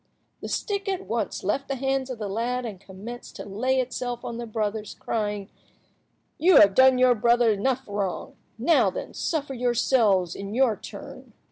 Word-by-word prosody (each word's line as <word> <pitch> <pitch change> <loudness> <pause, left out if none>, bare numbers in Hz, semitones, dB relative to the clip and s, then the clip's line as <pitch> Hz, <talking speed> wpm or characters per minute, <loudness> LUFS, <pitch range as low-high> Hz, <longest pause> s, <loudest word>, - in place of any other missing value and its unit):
The - - -5
stick 400 -1 -2
at 380 -2 -3
once 220 0 -3
left 270 +8 -1
the 275 - -2
hands 270 0 -1
of 255 - -5
the 215 -2 -4
lad 240 +5 -2
and 210 -5 -6
commenced 200 +6 -10
to - - -7
lay 255 +7 0
itself 245 -1 -3
on 235 - -4
the 235 0 -5
brothers, 215 -1 -3
crying— 205 -3 -3 0.9
"You 360 +3 +5
have 200 -1 +7
done 260 +3 +6
your 250 0 +5
brother 235 0 +3
enough 255 +6 0
wrong. 200 -3 -3 0.2
Now, 285 +9 +4
then, - - -6
suffer 290 -4 -2
yourselves 235 -7 +2
in 200 +2 -6
your 250 -4 +3
turn." - - -11
235 Hz, 170 wpm, -25 LUFS, 210-260 Hz, 0.9 s, have